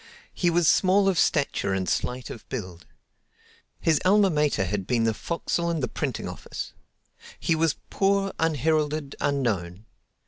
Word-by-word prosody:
He 175 Hz, -, +1 dB
was 170 Hz, -1 st, +2 dB
small 195 Hz, +3 st, +4 dB
of 190 Hz, -3 st, +2 dB
stature 140 Hz, -9 st, +1 dB
and 95 Hz, -1 st, -2 dB
slight 125 Hz, 0 st, -2 dB
of 115 Hz, -, -11 dB
build. 90 Hz, -9 st, -6 dB, 0.9 s
His 160 Hz, -3 st, +2 dB
alma 195 Hz, 0 st, +4 dB
mater 150 Hz, -10 st, +1 dB
had 95 Hz, 0 st, -3 dB
been 120 Hz, -2 st, +1 dB
the 115 Hz, -1 st, +2 dB
forecastle 170 Hz, +5 st, -2 dB
and 165 Hz, -4 st, -1 dB
the -, -, +1 dB
printing -, -, -3 dB
office. -, -, -7 dB, 0.7 s
He 170 Hz, -, +1 dB
was 160 Hz, -1 st, +2 dB, 0.2 s
poor, 195 Hz, 0 st, +1 dB
unheralded, 155 Hz, -1 st, 0 dB
unknown. 110 Hz, -9 st, -1 dB
150 Hz, 145 wpm, -26 LUFS, 115-170 Hz, 0.9 s, small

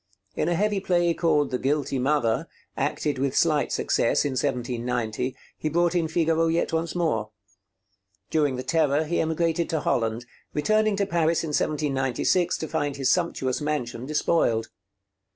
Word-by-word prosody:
In 160 Hz, -, 0 dB
a 175 Hz, -, +1 dB
heavy 205 Hz, +2 st, +1 dB
play 175 Hz, -3 st, +2 dB
called 150 Hz, -4 st, +1 dB
'The 125 Hz, -, -1 dB
Guilty 140 Hz, -1 st, 0 dB
Mother,' 125 Hz, -4 st, +1 dB, 0.3 s
acted 145 Hz, -3 st, -1 dB
with 135 Hz, -1 st, 0 dB
slight 155 Hz, -3 st, +2 dB
success -, -, +1 dB
in 145 Hz, -, 0 dB
1790, 125 Hz, -1 st, -2 dB, 0.2 s
he 155 Hz, -, -3 dB
brought 170 Hz, +2 st, +2 dB
in 170 Hz, -2 st, +1 dB
Figaro 165 Hz, 0 st, +1 dB
yet 165 Hz, 0 st, 0 dB
once 165 Hz, +1 st, -1 dB
more. 155 Hz, -12 st, 0 dB, 1.0 s
During 145 Hz, -4 st, +2 dB
the 125 Hz, -, -4 dB
Terror 150 Hz, +1 st, +2 dB
he 170 Hz, +2 st, 0 dB
emigrated 165 Hz, +1 st, 0 dB
to 160 Hz, -2 st, -1 dB
Holland, 115 Hz, -2 st, 0 dB, 0.3 s
returning 215 Hz, +7 st, +2 dB
to 200 Hz, 0 st, +1 dB
Paris 170 Hz, -3 st, +1 dB
in 160 Hz, -, -3 dB
1796 145 Hz, +3 st, 0 dB
to 160 Hz, -, -4 dB
find 145 Hz, -1 st, -2 dB
his 135 Hz, -1 st, +1 dB
sumptuous 155 Hz, -7 st, 0 dB
mansion 130 Hz, -5 st, -3 dB
despoiled. 150 Hz, -6 st, +1 dB
150 Hz, 150 wpm, -25 LUFS, 130-165 Hz, 1.0 s, play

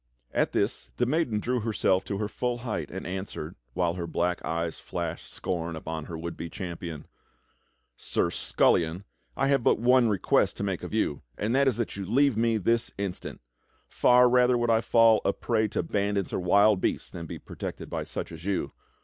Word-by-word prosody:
At -, -, +1 dB
this -, -, -1 dB
the -, -, +2 dB
maiden 130 Hz, -5 st, +1 dB
drew 125 Hz, +3 st, 0 dB
herself 105 Hz, -4 st, +1 dB
to 100 Hz, -, -3 dB
her 105 Hz, 0 st, -1 dB
full 120 Hz, +3 st, -2 dB
height 85 Hz, -, -3 dB
and -, -, -6 dB
answered, 90 Hz, -3 st, -5 dB, 0.2 s
while 85 Hz, -2 st, +1 dB
her 85 Hz, -1 st, -4 dB
black 90 Hz, +2 st, -1 dB
eyes 85 Hz, 0 st, -2 dB
flashed 85 Hz, -1 st, -5 dB
scorn 85 Hz, -2 st, -3 dB
upon 80 Hz, 0 st, -5 dB
her 85 Hz, -, -6 dB
would 85 Hz, +1 st, -5 dB
be 85 Hz, -, -6 dB
champion: 85 Hz, -5 st, -6 dB, 0.9 s
"Sir 85 Hz, -, -1 dB
Scullion, 85 Hz, +2 st, +2 dB, 0.3 s
I -, -, +2 dB
have 140 Hz, -2 st, +3 dB
but -, -, +4 dB
one 125 Hz, 0 st, +4 dB
request 100 Hz, -4 st, +2 dB
to -, -, -3 dB
make -, -, -2 dB
of -, -, -6 dB
you, 70 Hz, -, 0 dB, 0.2 s
and 110 Hz, +3 st, -1 dB
that 140 Hz, 0 st, +4 dB
is 125 Hz, -4 st, +2 dB
that 115 Hz, -4 st, -3 dB
you 100 Hz, -, -3 dB
leave 135 Hz, +3 st, +3 dB
me 115 Hz, 0 st, +2 dB
this 115 Hz, +4 st, +1 dB
instant. 100 Hz, -3 st, -5 dB, 0.5 s
Far 125 Hz, 0 st, +5 dB
rather 125 Hz, 0 st, +4 dB
would 120 Hz, -1 st, +1 dB
I 115 Hz, 0 st, +4 dB
fall 115 Hz, -1 st, +5 dB
a 100 Hz, -, +2 dB
prey 110 Hz, -2 st, 0 dB
to 100 Hz, -, -2 dB
bandits 100 Hz, +2 st, -1 dB
or -, -, 0 dB
wild 100 Hz, +2 st, +4 dB
beasts -, -, -1 dB
than 85 Hz, -2 st, -7 dB
be -, -, -6 dB
protected -, -, -7 dB
by -, -, -3 dB
such -, -, -5 dB
as 80 Hz, 0 st, -9 dB
you. 100 Hz, 0 st, -1 dB
100 Hz, 195 wpm, -27 LUFS, 85-115 Hz, 0.9 s, Far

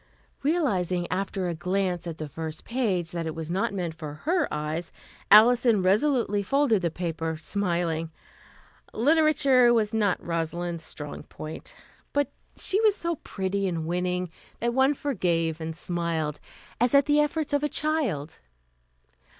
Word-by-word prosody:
Realizing 195 Hz, -, +1 dB
after 190 Hz, 0 st, -1 dB
a 175 Hz, -, -1 dB
glance 180 Hz, 0 st, -1 dB
at 165 Hz, -2 st, -5 dB
the 155 Hz, -, -5 dB
first 160 Hz, +2 st, -6 dB
page 205 Hz, -9 st, -1 dB
that 170 Hz, -1 st, -3 dB
it 160 Hz, -, -4 dB
was 165 Hz, 0 st, -5 dB
not 190 Hz, +2 st, 0 dB
meant 180 Hz, -5 st, -3 dB
for 155 Hz, -2 st, -7 dB
her 335 Hz, -1 st, +1 dB
eyes, 155 Hz, +3 st, -3 dB, 0.4 s
Alison 230 Hz, -1 st, +6 dB
resolutely 210 Hz, +1 st, +2 dB
folded 240 Hz, -1 st, +2 dB
the 170 Hz, -, +1 dB
paper, 165 Hz, -1 st, -3 dB
smiling. 170 Hz, -1 st, -1 dB, 0.9 s
Literature 280 Hz, -2 st, +4 dB
was 220 Hz, -2 st, +2 dB
not 210 Hz, -4 st, +2 dB
Rosalind's 170 Hz, 0 st, -3 dB
strong 150 Hz, -2 st, -7 dB
point, 155 Hz, +1 st, -9 dB, 0.4 s
but 285 Hz, 0 st, +1 dB, 0.3 s
she 400 Hz, +3 st, +2 dB
was 430 Hz, -2 st, +4 dB
so 340 Hz, -4 st, -2 dB
pretty 195 Hz, -2 st, -2 dB
and 165 Hz, -3 st, -2 dB
winning 180 Hz, +1 st, -1 dB, 0.3 s
that 235 Hz, +1 st, 0 dB
one 265 Hz, +3 st, +3 dB
forgave 170 Hz, -, -1 dB
and 160 Hz, 0 st, -4 dB
smiled, 165 Hz, -3 st, -2 dB, 0.4 s
as 245 Hz, +3 st, +3 dB
at 280 Hz, -, +6 dB
the 295 Hz, 0 st, +3 dB
efforts 295 Hz, 0 st, 0 dB
of 285 Hz, -, +3 dB
a 295 Hz, -, 0 dB
child. 265 Hz, -, -1 dB
185 Hz, 145 wpm, -26 LUFS, 165-255 Hz, 0.9 s, Alison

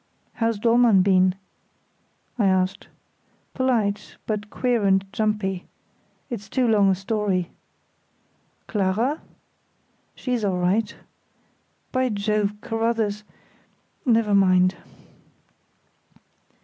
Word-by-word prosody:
"How's 230 Hz, -2 st, 0 dB
Dollmann 230 Hz, -3 st, +4 dB
been?" 185 Hz, -1 st, +3 dB, 1.0 s
I 205 Hz, -, +3 dB
asked. 190 Hz, 0 st, 0 dB, 0.7 s
"Polite, 230 Hz, -6 st, -1 dB
but 210 Hz, -1 st, -3 dB
queer 245 Hz, -1 st, 0 dB
and 195 Hz, -1 st, +3 dB
jumpy. 210 Hz, -4 st, -1 dB, 0.6 s
It's 205 Hz, -4 st, -7 dB
too 255 Hz, +1 st, +1 dB
long 205 Hz, -3 st, +4 dB
a 190 Hz, -, +3 dB
story." 195 Hz, -2 st, -1 dB, 1.1 s
"Clara?" 215 Hz, +8 st, 0 dB, 0.9 s
"She's 250 Hz, -4 st, -2 dB
all 190 Hz, -3 st, 0 dB
right. 205 Hz, +5 st, 0 dB, 1.0 s
By 255 Hz, -1 st, +1 dB
Jove! 210 Hz, -1 st, 0 dB
Carruthers—never 225 Hz, 0 st, -2 dB
mind." 185 Hz, -2 st, +4 dB
210 Hz, 85 wpm, -23 LUFS, 195-230 Hz, 1.1 s, Dollmann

